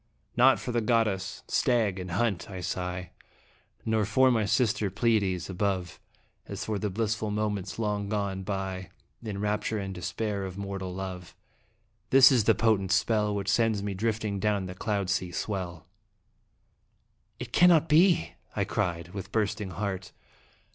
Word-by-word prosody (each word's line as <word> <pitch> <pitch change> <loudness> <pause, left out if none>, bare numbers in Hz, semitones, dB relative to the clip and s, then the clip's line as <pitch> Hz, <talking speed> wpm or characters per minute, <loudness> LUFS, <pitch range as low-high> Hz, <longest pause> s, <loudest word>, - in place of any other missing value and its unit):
Not 130 +2 +5
for 125 - -4
the 120 0 +1
goddess, 110 -4 0
stag, 110 -6 +1
and 90 0 -6
hunt, 100 +1 -1
I 95 -2 -6
sigh 90 0 -4 0.7
Nor 110 -1 +2
for 130 +5 +4
my 110 -3 +2
sister 105 -2 +1
Pleiades 100 -4 +1
above, 95 -2 -2 0.5
As - - -5
for 105 -2 -2
the 105 - -1
blissful 110 +1 -1
moments 105 -2 -2
long 105 -2 -1
gone 100 -2 -2
by 95 -2 -4 0.3
In 105 -4 -5
rapture 105 +1 -1
and 95 -2 -4
despair 100 +3 -3
of 95 -1 -6
mortal 100 -2 -4
love. 90 -2 -6 0.7
This 130 0 +8
is 120 -6 +3
the 115 - +5
potent 100 -3 +2
spell 105 +2 +2
Which 100 -1 -3
sends 110 -2 +2
me 100 -1 -2
drifting 105 0 -1
down 100 -1 0
the 90 - -6
cloud 100 0 -2
sea 90 -2 -1
swell! 90 -3 -4 1.5
"It - - -8
cannot 170 -3 +6
be!" 170 +2 +4 0.2
I - - +1
cried, 85 -4 -2
with 100 +1 -7
bursting 105 -2 -1
heart. 95 +1 -4
100 Hz, 150 wpm, -28 LUFS, 95-110 Hz, 1.5 s, This